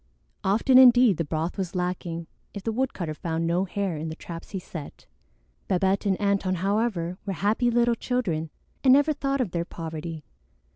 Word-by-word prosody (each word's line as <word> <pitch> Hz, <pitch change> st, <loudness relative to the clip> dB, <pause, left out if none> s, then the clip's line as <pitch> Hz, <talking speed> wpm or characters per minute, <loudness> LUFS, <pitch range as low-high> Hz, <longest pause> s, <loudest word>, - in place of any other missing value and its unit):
Often 230 Hz, +7 st, +5 dB
indeed 245 Hz, -6 st, +7 dB
the 165 Hz, -, 0 dB
broth 160 Hz, +5 st, -3 dB
was 185 Hz, -1 st, -3 dB
lacking 180 Hz, -2 st, -3 dB, 0.3 s
if 200 Hz, -, -6 dB
the 225 Hz, -, -1 dB
woodcutter 215 Hz, -9 st, -2 dB
found 165 Hz, +1 st, -2 dB
no 175 Hz, +3 st, +1 dB
hare 195 Hz, -3 st, -2 dB
in 160 Hz, +2 st, -4 dB
the 160 Hz, -, -6 dB
traps 165 Hz, 0 st, -9 dB
he 195 Hz, -, -4 dB
set. 165 Hz, -5 st, -9 dB, 0.6 s
Babette 190 Hz, +2 st, +1 dB
and 190 Hz, -2 st, +2 dB
Antone, 200 Hz, -2 st, +1 dB
however, 190 Hz, -2 st, -1 dB
were 200 Hz, -, -3 dB
happy 210 Hz, -, +1 dB
little 240 Hz, 0 st, +3 dB
children 205 Hz, -11 st, -2 dB, 0.3 s
and 260 Hz, -2 st, +7 dB
never 290 Hz, +3 st, +4 dB
thought 275 Hz, -1 st, -1 dB
of 215 Hz, -8 st, -2 dB
their 170 Hz, -1 st, -1 dB
poverty. 160 Hz, -2 st, -6 dB
190 Hz, 175 wpm, -26 LUFS, 165-230 Hz, 0.6 s, indeed